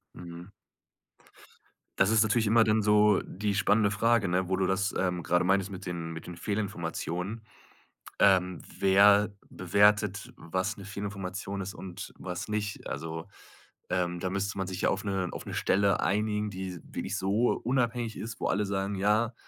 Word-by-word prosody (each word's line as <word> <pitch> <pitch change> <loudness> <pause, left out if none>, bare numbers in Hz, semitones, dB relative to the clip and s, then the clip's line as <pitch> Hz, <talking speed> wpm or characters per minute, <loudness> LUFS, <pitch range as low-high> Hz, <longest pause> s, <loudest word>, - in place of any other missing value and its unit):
Mhm. 85 0 -9 1.5
Das 95 - +5
ist 110 -1 +5
natürlich 110 0 +1
immer 115 +1 +5
dann 110 0 +3
so 105 0 +4
die 100 +1 -2
spannende 100 +1 +3
Frage, 110 0 +2
ne, 90 +1 0
wo 95 - +1
du 95 - +1
das, 95 +1 0
ähm, 90 -2 -1
grade 90 +2 +2
meintest 95 +1 +2
mit 95 0 -8
den 85 -2 -4
mit 80 0 -8
den 90 - -7
Fehlinformationen. 95 +1 -3 0.8
Ähm, 95 -3 +3 0.2
wer 100 +2 +5 0.2
bewertet, 100 +2 +2
was 95 +6 -2
'ne 100 - -9
Fehlinformationen 100 -1 -5
ist 95 +2 -5
und 95 -3 -8
was 90 +3 -5
nicht? 105 -1 -3
Also, 80 +2 -5 0.6
ähm, 90 -1 -1
da 95 - -2
müsste 100 +1 -2
man 95 - -2
sich 95 0 -5
ja - - +3
auf 95 - -1
'ne 95 -3 -1
auf - - -7
'ne - - -5
Stelle 100 -1 +2
einigen, 105 +1 0
die 95 -2 -6
wirklich 100 - -4
so 100 +6 +2
unabhängig 120 -2 0
ist, 115 +1 -6
wo - - -3
alle 105 - +1
sagen: 100 0 -2
„Ja, 105 +4 +2
100 Hz, 165 wpm, -29 LUFS, 90-105 Hz, 1.5 s, Das